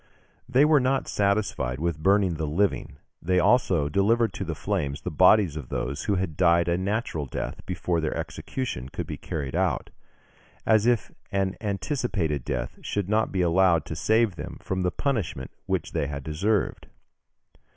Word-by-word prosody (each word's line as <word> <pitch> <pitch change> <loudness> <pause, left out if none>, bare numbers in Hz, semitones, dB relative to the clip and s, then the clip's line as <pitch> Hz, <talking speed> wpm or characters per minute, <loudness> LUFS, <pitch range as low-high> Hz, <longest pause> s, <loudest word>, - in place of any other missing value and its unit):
They 135 +3 +5
were 150 -1 +5
not 130 +1 +1
satisfied 100 -11 0
with 80 -1 -2
burning 95 +1 +3
the 80 -1 -3
living, 85 -3 0 0.2
they 90 +2 +1
also 90 - +3
delivered 105 +6 +2
to - - -4
the 80 -3 -4
flames 70 +1 -2
the 90 - -4
bodies 90 +1 +5
of 75 -5 -7
those 70 +4 -3
who 100 - +1
had 90 -4 -2
died 85 -1 +4
a 85 - +2
natural 95 - -2
death - - -5
before 85 -2 -1
their 80 - -2
execution 80 - -4
could - - -5
be - - -5
carried 70 -4 -4
out, - - 0 0.7
as 110 0 +4
if 120 -5 +1 0.2
an 95 -1 0
anticipated 100 - -1
death - - -4
should 100 -2 -2
not 110 +1 +2
be 95 - 0
allowed 85 -2 +3
to 80 - -5
save 110 +2 +2
them - - -7
from 95 -1 -3
the 90 - +2
punishment 100 - -2 0.2
which - - -1
they 70 - -1
had 70 -1 -5
deserved. 95 +8 -1
90 Hz, 170 wpm, -26 LUFS, 80-105 Hz, 0.7 s, They